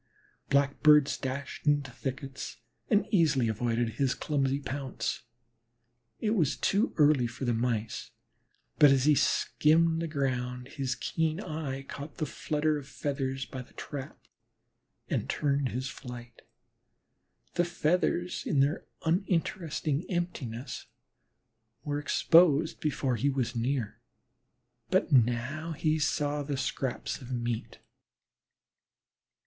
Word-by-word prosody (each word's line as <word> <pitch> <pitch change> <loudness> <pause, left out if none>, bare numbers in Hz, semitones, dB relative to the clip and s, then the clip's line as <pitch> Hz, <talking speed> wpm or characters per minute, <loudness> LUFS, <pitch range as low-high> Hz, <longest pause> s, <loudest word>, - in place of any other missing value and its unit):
Blackbirds 140 +1 +5
dashed 135 +2 -5
into 145 -2 +2
thickets, 135 +1 -5 0.3
and 205 0 +4
easily 150 - +3
avoided 115 +2 0
his 130 +4 0
clumsy 140 -2 0
pounce. 135 -3 -4 0.9
It 215 - 0
was 175 - +2
too 205 +6 +2
early 145 -5 +5
for 120 +3 -5
the 120 - +2
Mice, 115 -2 -1 0.7
but, 145 - +9
as 135 -1 +4
he 150 - +6
skimmed 160 +3 +3
the 165 - -1
ground, 125 -4 -2
his 135 -3 -2
keen 160 +3 -1
eye 150 -7 -4
caught 145 +2 -8
the 155 - -1
flutter 150 +1 -1
of 140 - -11
feathers 135 -2 -3
by 130 - -7
the 125 - -15
trap 140 -3 -6 0.9
and - - -2
turned 140 -2 +1
his 130 +2 -3
flight. 120 -3 -9 1.1
The 175 - +2
feathers 175 +1 0
in 145 - +1
their 140 +4 +2 0.2
uninteresting 165 -3 0
emptiness 145 -9 -4 1.0
were 145 -1 -1
exposed 160 0 +4
before 135 -4 0
he 140 +6 +2
was 130 -3 -1
near, 120 -2 -1 0.9
but 185 -2 +2
now 130 +6 +2
he 155 +1 +1
saw 150 -1 0
the 140 -1 -3
scraps 130 +1 -2
of 130 0 -9
meat. 120 -2 -3
140 Hz, 120 wpm, -30 LUFS, 130-155 Hz, 1.1 s, but